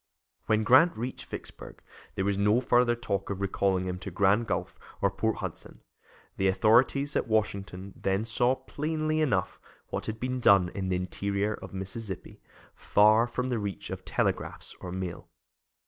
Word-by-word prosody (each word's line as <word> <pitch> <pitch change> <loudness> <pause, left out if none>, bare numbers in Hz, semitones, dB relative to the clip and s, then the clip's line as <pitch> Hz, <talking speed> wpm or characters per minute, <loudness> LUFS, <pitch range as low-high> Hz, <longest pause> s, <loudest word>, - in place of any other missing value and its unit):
When 110 0 +2
Grant 130 +9 +5
reached 125 +3 -5
Vicksburg, - - -9 0.3
there 95 - -1
was 100 0 +1
no 105 +4 +3
further 120 -1 +3
talk 100 -5 -3
of 100 -1 -3
recalling 95 -1 0
him 90 0 -3
to 95 - -6
Grand 100 +5 +2
Gulf - - -3 0.2
or - - +2
Port - - 0
Hudson. - - -7 0.6
The 95 - +2
authorities 120 +8 +3
at - - 0
Washington 100 -3 -2
then 95 +3 -1
saw 120 +3 +2
plainly 155 +3 -2
enough 105 -12 0 0.3
what - - -4
had 110 0 -4
been 125 +1 -2
done 100 -6 +5
in 95 0 -4
the 90 - +1
interior 100 +3 -1
of - - -9
Mississippi, 95 +1 -6 0.3
far 110 +3 +4
from 125 +1 -3
the 120 -3 0
reach 100 -2 -5
of - - -6
telegraphs - - -2
or 90 - -6
mail. 90 -2 -5
105 Hz, 165 wpm, -28 LUFS, 95-120 Hz, 0.6 s, Grant